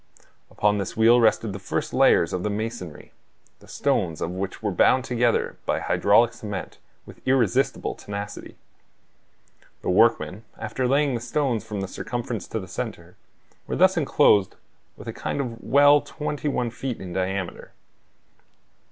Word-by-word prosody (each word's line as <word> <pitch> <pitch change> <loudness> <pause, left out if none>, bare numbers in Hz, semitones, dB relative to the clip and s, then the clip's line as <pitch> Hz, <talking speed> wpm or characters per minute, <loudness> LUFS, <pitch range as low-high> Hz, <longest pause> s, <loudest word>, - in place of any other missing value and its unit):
Upon 105 0 +1
this 100 - -5
wheel 115 +2 +6
rested 110 -2 +2
the 100 - -6
first 95 - -3
layers 85 +2 +4
of 90 - -1
the 105 - -1
masonry, 105 -6 -5 0.5
the - - -18
stones 80 -2 -1
of 85 - -3
which 95 +3 -5
were 105 - 0
bound 130 +8 +3
together 120 -2 0
by - - +1
hydraulic 110 +4 +3
cement, 105 -5 -7 0.3
with - - -14
irresistible 130 -7 +1
tenacity. 100 0 -7 1.3
The - - 0
workmen, 110 0 +2
after 125 +4 -2
laying 140 +1 +2
the 120 - -3
stones 120 -1 -1
from 105 -3 -5
the 95 - -3
circumference 120 +2 -5
to 110 - -3
the 95 - -8
center, - - -6 0.5
were - - -2
thus 190 +1 +4
enclosed 105 - +3 0.4
within - - -7
a - - -13
kind - - -3
of 115 -4 -4
well 145 +1 +5
twenty 150 -1 -4
one 125 -4 -1
feet 125 0 -5
in 90 -2 -7
diameter. 95 -1 -3
110 Hz, 150 wpm, -24 LUFS, 100-125 Hz, 1.3 s, wheel